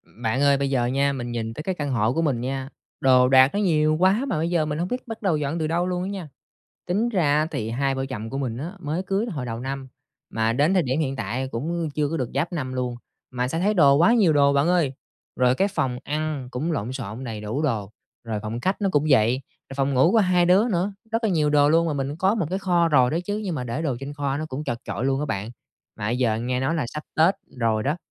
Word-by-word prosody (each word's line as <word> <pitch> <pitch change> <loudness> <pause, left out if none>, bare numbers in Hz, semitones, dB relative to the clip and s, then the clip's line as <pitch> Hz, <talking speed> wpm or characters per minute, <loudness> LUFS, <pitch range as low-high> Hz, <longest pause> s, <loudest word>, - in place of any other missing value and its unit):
Bạn 120 +3 -1
ơi, 140 -1 +4
bây 140 0 -1
giờ 125 -3 +1
nha 140 +3 +1
mình 120 -3 -5
nhìn 115 -1 -3
tới 150 - -7
cái 185 +2 -2
căn 145 -4 -3
hộ 115 -1 +1
của 165 - 0
mình 140 -7 0
nha, 135 +1 -3 0.3
đồ 125 -1 +5
đạc 130 0 +7
nó 205 - 0
nhiều 155 -6 +2
quá, 195 +8 +3
mà 225 - -1
bây 165 +2 0
giờ 170 -3 +1
mình 150 0 -3
hông 175 - -1
biết 250 +5 -4
bắt 225 -1 -7
đầu 185 -7 +1
dọn 150 +3 -2
từ 155 - 0
đâu 170 +2 0
luôn 180 -1 -2
á 190 - -3
nha. 195 -5 -5 0.6
Tính 205 +7 +1
ra 175 -11 +2
á 155 - +1
thì 110 -7 -3
hai 135 +3 0
vợ 135 0 -2
chồng 115 -4 -6
của 135 - -4
mình 125 -5 -2
á 155 +8 -5
mới 160 +3 -2
cưới 195 +4 0
hồi 150 - -4
đầu 115 0 -4
năm 135 0 -5 0.4
mà 110 0 +1
đến 145 +9 +2
thời 185 - +4
điểm 135 +1 -1
hiện 135 -3 -1
tại 120 +5 -3
cũng 160 +7 -3
chưa 150 -1 0
có 165 - -2
được 130 -6 -2
giáp 155 +6 -1
năm 130 -6 -3
luôn, 125 -1 -2 0.4
mà 125 0 -2
sao 165 +5 -2
thấy 210 +3 +2
đồ 140 -7 +6
quá 175 +10 +5
nhiều 200 -9 +4
đồ 140 -1 +4
bạn 140 +4 +2
ơi. 170 -7 +2 0.4
Rồi 125 0 +3
cái 195 +9 +1
phòng 130 -10 -1
ăn 150 -3 -3
cũng 145 +7 -2
lộn 125 -5 -3
xộn 125 -2 -6
đầy 110 -4 -5
đủ 110 +8 -3
đồ, 110 -9 -1 0.3
rồi 110 -2 -3
phòng 115 +2 -4
khách 190 - -1
nó 200 - +1
cũng 145 0 +2
vậy, 125 0 +4 0.3
rồi 135 - -8
phòng 135 0 +1
ngủ 130 +6 +5
của 230 - +5
hai 180 -4 +3
đứa 195 +6 +4
nữa, 190 -1 0 0.2
rất 225 +1 0
là 220 - +2
nhiều 155 -4 +2
đồ 145 -1 +4
luôn. 165 +2 +3
Mà 160 - 0
mình 140 +1 -3
có 190 +5 +2
một 205 -8 -1
cái 190 - -1
kho 175 -3 +2
rồi 130 -5 +4
đó 160 - 0
chứ, 205 +1 -2
nhưng 185 -4 -2
mà 125 - -3
để 120 +5 -3
đồ 140 -6 -1
trên 140 +1 -6
kho 140 -2 -2
nó 155 +2 -3
cũng 145 +1 -5
chật 120 - -3
chội 120 - -3
luôn 135 0 +1
á 150 - -2
bạn. 105 -3 -3 0.5
Mà - - -6
bây 120 +2 -1
giờ 115 -4 +2
nghe 125 +2 -1
nói 140 +5 0
là 160 - 0
sắp 150 +5 -6
Tết 165 +5 +5 0.2
rồi 110 -2 +1
đó, 145 +6 0
140 Hz, 280 wpm, -24 LUFS, 125-170 Hz, 0.6 s, đạc